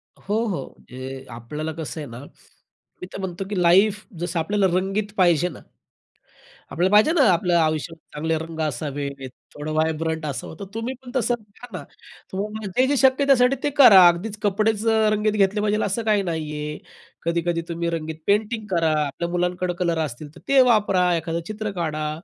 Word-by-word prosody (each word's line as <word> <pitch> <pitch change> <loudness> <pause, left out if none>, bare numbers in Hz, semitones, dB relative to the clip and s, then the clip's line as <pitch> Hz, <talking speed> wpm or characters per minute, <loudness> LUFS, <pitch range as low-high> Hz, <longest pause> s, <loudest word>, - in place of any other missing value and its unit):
हो, 220 +4 -2
हो. 170 -10 -3
म्हणजे 130 +1 -9
आपल्याला 150 +7 -5
कसं 160 0 -6
आहे 145 - -7
ना, 120 +1 -9 0.8
मी 180 - -6
तर - - -6
म्हणतो 190 0 -4
की 190 -4 -1
लाईफ 200 +4 +4
जसं 175 -1 -2
आपल्याला 200 +4 +1
रंगीत 200 +2 -2
पाहिजे 175 -2 +3
ना. - - -11 1.1
आपल्याला 180 +4 +1
पाहिजे 215 +10 +6
ना, 315 - +3
आपलं 175 +1 0
आयुष्य, 155 -1 0 0.2
चांगले 160 +2 -1
रंग 160 0 -7
असावेत, 140 -1 -4 0.2
थोडं 150 +1 -5
व्हायब्रंट 160 0 -1
असावं, 140 +2 -5
तर 200 - -6
तुम्ही 230 +3 -3
पण 245 - -10
तसं 245 -1 +1
घ्या 215 +3 -15
ना. - - -8 0.5
तुम्हाला 210 +2 -4
जे 260 +1 +4
जे 285 0 +1
शक्य 265 +2 +4
त्यासाठी, 265 -1 +4
ते 290 - +2
करा. 195 -10 +9
अगदीच 200 +5 0
कपडेच 215 +2 +1
रंगीत 215 -1 +2
घेतले 205 0 +2
पाहिजे, 210 0 +1
असं 205 +4 -2
काही 210 -2 +2
नाहीये. 150 -3 -4 0.5
कधी-कधी 170 0 0
तुम्ही 170 0 -2
रंगीत 160 -1 -4
पेंटिंग 215 +2 +1
करा. 165 -2 +2
आपल्या 170 +5 -4
मुलांकडे 180 0 -1
कलर 170 -2 0
असतील, 145 +2 -8
तर - - -14
ते 275 -1 +6
वापरा, 190 -5 +2
एखादं 165 +1 -3
चित्र 215 -1 -4
काढा. 155 -2 -2
180 Hz, 175 wpm, -23 LUFS, 160-210 Hz, 1.1 s, करा